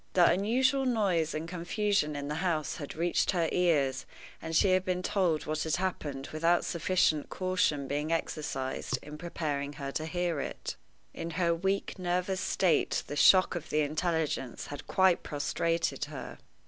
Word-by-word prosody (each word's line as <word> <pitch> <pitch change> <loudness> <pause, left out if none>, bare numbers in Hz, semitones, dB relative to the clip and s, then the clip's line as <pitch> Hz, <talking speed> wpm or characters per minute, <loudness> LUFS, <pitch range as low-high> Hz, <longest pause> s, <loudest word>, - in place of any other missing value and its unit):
The 175 -2 +6
unusual 255 +8 +2
noise 185 -10 +1
and 155 +2 -3
confusion 180 -2 0
in 145 0 -4
the 150 +3 -3
house 165 -5 -1
had 145 -4 -7
reached 170 +2 +1
her 170 -4 +2
ears, 140 -7 +1 0.3
and 160 0 -4
she 190 +4 +4
had 185 0 +3
been 180 -1 -1
told 175 -7 +1
what 155 0 -2
had 160 - 0
happened 150 -7 -3
without 170 +2 +2
sufficient 170 -3 +1
caution 185 -7 0
being 150 +3 -2
exercised 135 -5 -2
in 150 +1 -9
preparing 145 -4 -3
her 140 -2 -5
to 155 +3 -3
hear 175 -2 -1
it. - - -5 0.4
In 165 - -5
her 170 -2 +3
weak, 195 +3 -1
nervous 180 +1 -1
state, 180 -4 +1
the 145 - -6
shock 185 +5 +6
of 175 -4 -5
the 155 - +2
intelligence 155 -4 -1
had 145 - -8
quite 185 -2 +3
prostrated 150 0 -1
her. 145 -2 -8
165 Hz, 160 wpm, -30 LUFS, 150-185 Hz, 0.4 s, The